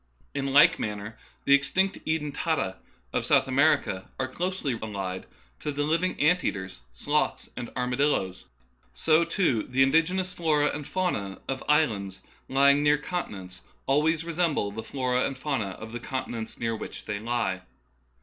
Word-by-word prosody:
In 140 -1 -2
like 165 +4 +6
manner 105 +1 -4 0.3
the 140 - +5
extinct 190 +7 +2
eden 155 -2 -1
tata 140 - -1 0.4
of - - 0
South - - +4
America 140 -8 +2
are 130 - 0
closely 175 -1 -2
allied 95 -4 -4 0.3
to 150 - -3
the 145 0 -1
living 165 +5 0
ant 180 +4 +4
eaters, 95 -7 -3
sloths, - - -1
and 120 -1 -5
armadilloes. 125 -7 0 0.5
So, 155 - +3
too, 165 - +1
the 130 +4 +2
indigenous 180 +6 +2
floras 150 -4 +2
and 145 -1 -5
faunas 110 - -1
of 135 -1 -3
islands 110 -11 +2 0.3
lying 140 +2 +5
near 150 0 +4
continents 95 - -5 0.2
always 155 +4 +2
resemble 165 -11 0
the 110 +2 -5
floras 125 0 0
and 135 - -6
faunas 115 -10 -2
of 110 0 -8
the 120 - -5
continents 120 -3 -4
near 115 -1 -1
which - - -8
they 105 -1 -3
lie. 110 -5 -1
135 Hz, 150 wpm, -27 LUFS, 110-155 Hz, 0.5 s, like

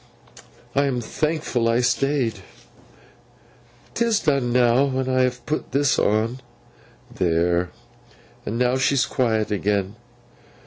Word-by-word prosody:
'I 140 - +3
am 130 -3 -1
thankful 135 -1 -1
I 115 +2 +2
stayed! 125 -3 0 1.5
'Tis 230 -2 +1
done 140 -6 +1
now, 125 +2 +4
when 130 -1 -2
I 130 0 +2
have 125 -1 -1
put 155 - -3
this 140 0 +2
on. 110 +4 +1 0.7
There! 85 0 +1 0.7
And 110 - -4
now 125 +1 +2
she's 135 0 +2
quiet 110 -5 0
again. 100 0 -1
125 Hz, 115 wpm, -22 LUFS, 110-135 Hz, 1.5 s, now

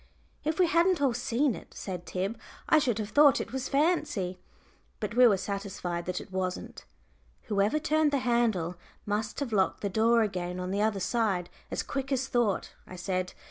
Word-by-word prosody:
"If 310 +1 -1
we 365 - +5
hadn't 340 +2 +3
all 275 -4 +2
seen 255 +3 +1
it," - - -11
said 180 -3 -6
Tib, 195 +5 -3 0.3
"I 310 - +6
should 245 -7 0
have 210 -2 -3
thought 290 +3 +6
it - - -5
was 265 0 -3
fancy." 285 - +1 0.6
But 210 -1 -3
we 250 +1 +7
were 205 -4 +4
satisfied 190 -3 -4
that 180 0 -2
it - - -11
wasn't. 185 -1 -4 0.6
"Whoever 205 +5 +1
turned 310 0 +2
the 285 - +2
handle 230 -9 +1 0.3
must 210 +1 -2
have 250 -5 -3
locked 190 -2 +1
the 200 - -1
door 225 +3 +4
again 180 -3 -3
on 180 0 -3
the 200 +1 0
other 215 -2 +1
side 195 -4 0 0.2
as - - -2
quick 270 0 -4
as 265 0 0
thought," 235 -6 0
I 185 - -9
said. 185 0 -2
220 Hz, 185 wpm, -29 LUFS, 190-265 Hz, 0.6 s, we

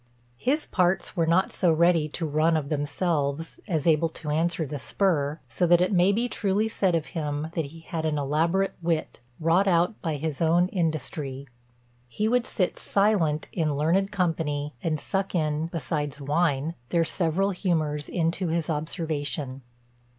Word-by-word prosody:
"His 295 +5 +1
parts 185 +1 0
were 165 -3 +1
not 175 +3 +2
so 175 -3 +3
ready 165 -1 +3
to 165 +2 -3
run 155 +2 +2
of 145 -2 -3
themselves, 150 0 -1
as 160 -7 -1
able 165 0 +3
to 155 -1 -6
answer 165 +1 0
the 145 0 -5
spur; 155 -4 0
so 130 +9 0
that 175 0 +6
it 180 +3 +2
may 180 +1 +5
be 230 +4 +1
truly 210 -2 0
said 190 -5 +1
of 160 -2 0
him, 150 -1 -2
that 165 -3 -1
he 165 +4 -11
had 165 0 -4
an 155 -1 0
elaborate 165 +7 +1
wit, 165 -2 -1 0.2
wrought 170 +5 +3
out 175 +3 +2
by 160 -4 -1
his 150 0 -3
own 170 +2 +3
industry. 150 -6 -3 0.6
He 210 - -1
would 245 +1 +2
sit 185 -4 -1
silent 195 -7 +1
in 155 -4 0
learned 185 +7 +2
company, 160 -6 -1
and 155 -2 -1
suck 195 +3 -2
in 155 -1 0
(besides 150 -2 -3
wine) 145 +1 0 0.2
their 165 -1 +2
several 185 +4 +1
humours 155 -6 -1
into 170 +2 0
his 165 0 -1
observation. 150 -4 -3
165 Hz, 165 wpm, -26 LUFS, 150-180 Hz, 0.6 s, that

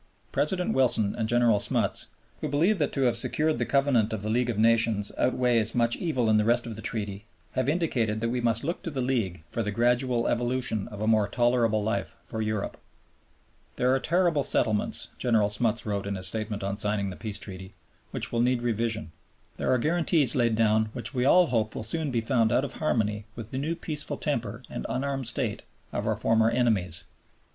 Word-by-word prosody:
President 180 +4 0
Wilson 115 -6 +2
and 110 -1 -2
General 120 -3 +3
Smuts, - - +1 0.3
who - - -3
believe 170 +8 +2
that 145 - +1
to 135 - -1
have 120 -2 +3
secured 155 +6 +1
the - - -1
Covenant 135 -6 +2
of 105 -2 -4
the 110 - -2
League 120 +1 +1
of 115 - -2
Nations 110 -2 +3
outweighs 120 -3 +2
much 120 -1 +2
evil 140 -9 -1
in 110 -1 +4
the 105 - +3
rest 120 +2 +2
of 115 -2 -6
the 110 - -8
Treaty, 105 -2 -4 0.3
have 130 +1 0
indicated 125 -10 0
that 115 +1 -1
we 125 0 -1
must 115 -1 +1
look 170 +5 -3
to - - -4
the 140 -4 -4
League 115 -10 -1
for 115 - -1
the 105 - -2
gradual 120 +2 +1
evolution 120 -3 -1
of 105 -1 -9
a 110 - -1
more 110 -2 +3
tolerable 120 -3 +1
life 115 +1 -2
for 110 - -4
Europe. 110 -2 -2 1.0
"There 125 +1 +2
are 135 - +2
territorial 170 -1 +2
settlements," 110 -5 +1
General 110 -4 +2
Smuts 110 +1 +1
wrote 100 -2 -2
in 100 - -2
his 95 -1 +1
statement 110 -2 -2
on 100 +1 -3
signing 105 -2 -1
the - - -8
Peace 105 -1 -4
Treaty, 95 -1 -8 0.3
"which - - -2
will 115 - +1
need 125 0 +1
revision. 115 -6 -1 0.5
There - - 0
are 130 - +4
guarantees 160 0 +1
laid 120 -3 +2
down 110 0 +2
which 125 +3 -3
we 125 -1 0
all 180 +6 +6
hope 115 -7 -1
will - - -4
soon 155 +7 0
be 120 -3 0
found 115 -2 +1
out 135 - +2
of 140 - -7
harmony 110 -8 -1
with 115 -2 -8
the 130 - -3
new 160 +4 -2
peaceful 155 -3 -5
temper - - -3
and - - -6
unarmed 135 -1 -2
state 120 -3 -2 0.3
of - - -2
our - - +1
former 115 0 +2
enemies. 110 -9 +1
115 Hz, 205 wpm, -27 LUFS, 110-130 Hz, 1.0 s, all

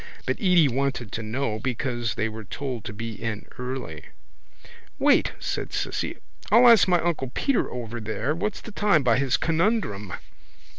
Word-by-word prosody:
But - - -1
Edy 180 -6 +5
wanted 135 -3 -1
to 115 - -3
know 110 0 -2
because 120 -1 -2
they 110 - 0
were 110 0 -7
told 125 +2 -5
to - - -4
be 115 +2 -5
in 110 -1 -4
early. 125 - -5 0.9
—Wait, - - +3
said - - -3
Cissy, - - -2 0.3
I'll 230 +3 +7
run 245 -1 +9
ask 225 -5 +6
my 175 -1 +4
uncle 160 -6 -1
Peter 275 -4 +1
over 120 -1 -5
there 110 +6 -2
what's 195 +5 -3
the 225 - -9
time 205 -8 +3
by 125 -1 +3
his 135 -2 +2
conundrum. 165 - 0
130 Hz, 165 wpm, -25 LUFS, 110-170 Hz, 0.9 s, run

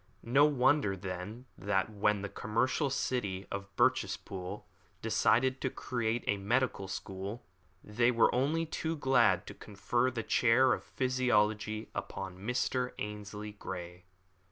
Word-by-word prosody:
No 135 +5 +5
wonder, 135 -7 +3
then, 95 +6 -6
that 100 +1 0
when 105 -1 +1
the - - -2
commercial 125 +8 0
city 105 -8 -2
of 100 0 -4
Birchespool 90 -2 -1 0.3
decided 130 +2 +2
to 130 - 0
create 120 -2 -2
a 105 - +1
medical 110 0 0
school, 100 +3 -6 0.4
they 120 +3 +2
were 115 -2 +4
only 150 +7 +1
too 160 0 -3
glad 130 - +3
to - - -8
confer 120 +5 -1
the 115 -3 -4
chair 125 +4 +4
of - - -3
physiology 110 -4 0
upon 95 -1 -5
Mr. 125 +3 -1
Ainslie 105 0 -6
Grey. 90 -3 -8
110 Hz, 130 wpm, -32 LUFS, 100-130 Hz, 0.4 s, No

